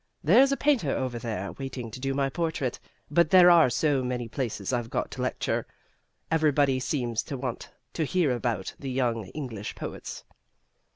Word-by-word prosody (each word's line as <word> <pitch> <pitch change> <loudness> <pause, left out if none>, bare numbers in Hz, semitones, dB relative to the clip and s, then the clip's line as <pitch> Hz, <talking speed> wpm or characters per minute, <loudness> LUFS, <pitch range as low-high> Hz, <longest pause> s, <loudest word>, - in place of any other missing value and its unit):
There's 245 - +6
a 275 - +1
painter 275 - +2
over 130 -3 -2
there 110 -4 -4
waiting 135 -4 -6
to 130 - -8
do 135 +1 -2
my 140 0 +1
portrait. 140 -4 -2 0.3
But 170 +1 +4
there 180 0 +8
are 165 -6 +6
so 135 +2 +1
many 125 -2 -3
places 115 -3 -3
I've 120 -2 -1
got - - -2
to - - -5
lecture - - -1 0.6
everybody 145 -4 +3
seems 125 -5 -1
to 140 - -6
want 125 -2 -5 0.2
to 165 - -1
hear 170 -2 +1
about 120 -6 -2
the 135 - -5
young 120 -4 0
English 115 -6 -6
poets." - - -7
135 Hz, 170 wpm, -27 LUFS, 120-155 Hz, 0.6 s, there